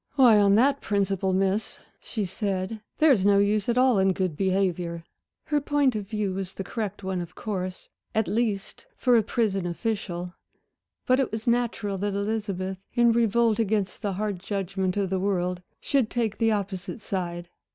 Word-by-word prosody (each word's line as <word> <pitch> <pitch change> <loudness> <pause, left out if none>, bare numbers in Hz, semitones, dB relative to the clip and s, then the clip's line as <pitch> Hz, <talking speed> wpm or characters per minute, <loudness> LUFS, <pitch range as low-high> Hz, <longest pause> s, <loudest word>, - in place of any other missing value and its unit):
"Why, 245 -6 +7
on 200 -1 +5
that 275 +5 +3
principle, 195 -2 0
Miss," 195 +3 0 0.2
she 215 -4 -3
said, 195 +2 -3 0.2
"there's 280 -11 +5
no 200 0 +5
use 205 +1 +2
at 235 - +1
all 255 -4 +4
in 190 0 +3
good 185 -4 -1
behavior." 180 -2 0 0.4
Her 295 -1 +1
point 285 -3 +2
of 205 -2 -4
view 210 -2 -2
was 190 0 -4
the 195 - -4
correct 205 -1 -4
one, 190 -1 -2
of 175 0 -9
course 185 -3 -4 0.3
at 220 -3 +2
least 215 - -2
for 250 -2 +3
a 230 - +6
prison 200 -4 0
official. 175 -1 -3 0.7
But 255 +1 +3
it 270 - 0
was 220 0 -4
natural 235 -5 0
that 205 0 -1
Elizabeth, 200 -3 -2 0.2
in 240 -1 +5
revolt 230 0 +2
against 210 -3 0
the 205 -3 -1
hard 205 -1 -2
judgment 195 -1 -2
of 195 -2 0
the 190 - +1
world, 180 -2 -1 0.2
should 265 -6 +1
take 225 -4 -1
the 225 -1 +3
opposite 200 -1 -3
side. 175 -3 -4
200 Hz, 170 wpm, -26 LUFS, 190-225 Hz, 0.7 s, Why